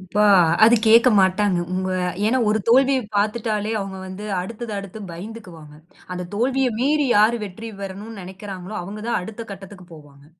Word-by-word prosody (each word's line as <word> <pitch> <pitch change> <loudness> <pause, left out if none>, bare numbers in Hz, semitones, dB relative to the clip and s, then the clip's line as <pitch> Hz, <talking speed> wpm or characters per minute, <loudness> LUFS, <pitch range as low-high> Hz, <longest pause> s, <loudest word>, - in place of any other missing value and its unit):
இப்பா, 195 +3 0 0.4
அது 230 - +6
கேக்க 230 +3 +7
மாட்டாங்க. 190 0 +2 0.2
உங்க 185 0 -2 0.4
ஏனா 250 +4 +2
ஒரு 215 +1 +2
தோல்விய 265 +2 +4 0.2
பாத்துட்டாலே 215 0 -1
அவங்க 195 -1 -6
வந்து 190 +2 -8 0.2
அடுத்தது 225 +4 -6
அடுத்து 200 +1 -8
பயந்துக்குவாங்க. 175 -5 -10 0.4
அந்த 180 0 -5
தோல்விய 260 +4 +1
மீறி 290 +2 +2
யாரு 220 +3 +4
வெற்றி 215 +4 -8
பெறணும்னு 200 +2 -7
நினைக்குறாங்களோ 190 +1 -8
அவங்க 200 +4 -8
தான் 235 - 0
அடுத்த 220 +4 -7
கட்டத்துக்குப் 190 -3 -12
போவாங்க. 145 -2 -16
205 Hz, 150 wpm, -22 LUFS, 185-225 Hz, 0.4 s, கேக்க